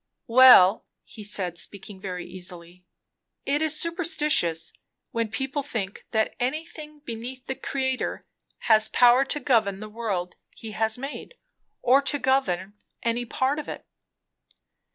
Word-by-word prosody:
"Well," 235 -5 +7 0.2
he 215 - -11
said, 185 -4 -2
speaking 200 -1 -7
very 180 -2 -5
easily, 180 -1 -9 0.6
"it 285 +2 0
is 310 -1 +2
superstition, 320 - +1 0.6
when 230 -1 -1
people 265 +6 -2
think 220 -8 -5
that 220 -1 0
anything 300 +3 -4
beneath 250 0 -7
the - - -2
Creator 260 -1 -3 0.4
has 220 -1 +4
power 245 +2 +5
to 295 - -1
govern 220 -8 +1
the 215 - -7
world 205 -5 -4 0.2
he 225 - -8
has 220 +1 +1
made 275 - -7 0.5
or 260 +3 +5
to 280 +1 0
govern 205 -9 0 0.3
any 235 +1 -1
part 265 +5 -1
of 305 - -7
it." - - -7
235 Hz, 135 wpm, -25 LUFS, 200-275 Hz, 0.6 s, Well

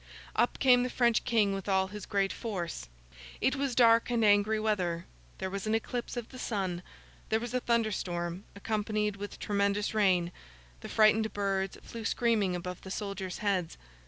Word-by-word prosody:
Up - - +2
came 250 -2 +5
the 250 - 0
French 240 -2 +2
King 215 -5 +3
with 195 0 -4
all 190 0 +2
his 210 0 -8
great 195 -1 +1
force. 180 - -4 0.5
It 265 - +2
was 275 -3 -1
dark 230 -1 +5
and 235 -2 +2
angry 205 +1 +4
weather; 180 -6 -1 0.3
there 190 - -4
was 200 +2 -4
an 215 - +2
eclipse 240 +2 -3
of 235 -2 -4
the 255 - -10
sun; 190 -7 -2 0.5
there 220 - +2
was 240 +1 -5
a 250 - +2
thunder 235 -3 +1
storm, 175 -1 -3
accompanied 210 0 -1
with 205 +1 -7
tremendous 200 +1 0
rain; 185 -5 +3 0.5
the - - -8
frightened 220 0 +4
birds 195 -1 -1
flew 230 -1 -8
screaming 220 -6 +1
above 180 +1 -5
the 190 - -9
soldiers' 195 -2 -4
heads. 185 -5 0
205 Hz, 175 wpm, -30 LUFS, 190-225 Hz, 0.5 s, came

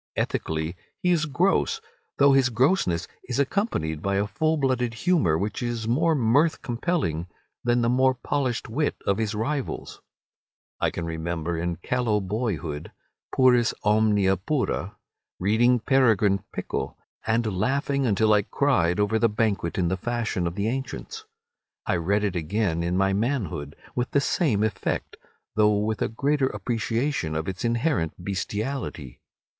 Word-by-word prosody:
Ethically 80 +2 -2 0.3
he 180 - +3
is 165 -2 +2
gross, 190 - +1 0.4
though 140 0 +6
his 135 -2 +4
grossness 115 - +1 0.2
is 125 - -3
accompanied 130 - 0
by 100 +2 0
a 100 +1 +2
full 155 +10 0
blooded 125 -4 0
humour 115 - +2
which 100 +5 -3
is 120 -2 -2
more 160 +7 +2
mirth 140 +6 +2
compelling 120 - -1 0.4
than 120 0 +2
the - - +2
more 130 +2 +3
polished 130 -1 -2
wit 145 +7 0
of 100 +2 +1
his 110 -1 -1
rivals. 130 +5 -3 0.8
I - - +2
can 85 - -5
remember 85 +1 -3
in 85 +1 -2
callow 110 +4 0
boyhood—puris 110 - 0
omnia 105 -2 +3
pura—reading 110 - -1
"Peregrine 110 -7 +3
Pickle," - - -4 0.3
and 110 -2 +1
laughing 140 +4 +1
until 110 0 +3
I 105 - +5
cried 105 -7 +1
over 105 +2 +2
the 115 - +3
Banquet 105 -5 -1
in 90 -3 +1
the 95 - 0
Fashion 115 -5 -1
of 85 - -4
the 100 +1 -1
Ancients. 135 - -4 0.6
I - - +1
read 100 +5 +1
it 100 -3 -1
again 85 0 0
in 85 +2 0
my 95 0 +2
manhood 100 - -2 0.2
with 125 0 -1
the 140 - +3
same 140 - +1
effect, 110 -1 -2 0.4
though 105 -1 +4
with 105 0 -1
a - - +2
greater 140 +4 +1
appreciation 115 - -1
of 80 +1 -2
its 95 -1 -4
inherent 120 - 0
bestiality. 100 - -4
110 Hz, 145 wpm, -25 LUFS, 95-130 Hz, 0.8 s, though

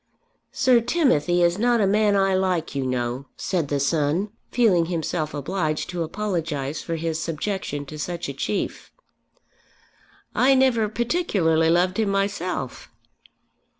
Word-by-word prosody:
"Sir 255 -3 +4
Timothy 200 - +2
is 170 +3 +2
not 240 +1 +3
a 205 - +3
man 205 +1 +3
I 195 -1 +3
like, 185 -4 0
you 135 -2 -2
know," 125 +1 -2
said 175 -6 -1
the 145 0 -1
son, 155 +7 0 0.2
feeling 195 -9 +3
himself 165 -2 -2
obliged 155 +2 -2
to 175 -1 -3
apologise 160 -6 -3
for 165 - -3
his 165 0 -2
subjection 165 -3 -3
to 150 +2 -9
such 175 +2 -4
a 140 - -4
chief. 195 +9 -3 1.4
"I 260 +4 +4
never 245 -5 +3
particularly 205 - +1
loved 180 +4 +2
him 215 -2 +1
myself." 195 -8 -2
175 Hz, 135 wpm, -24 LUFS, 155-210 Hz, 1.4 s, Sir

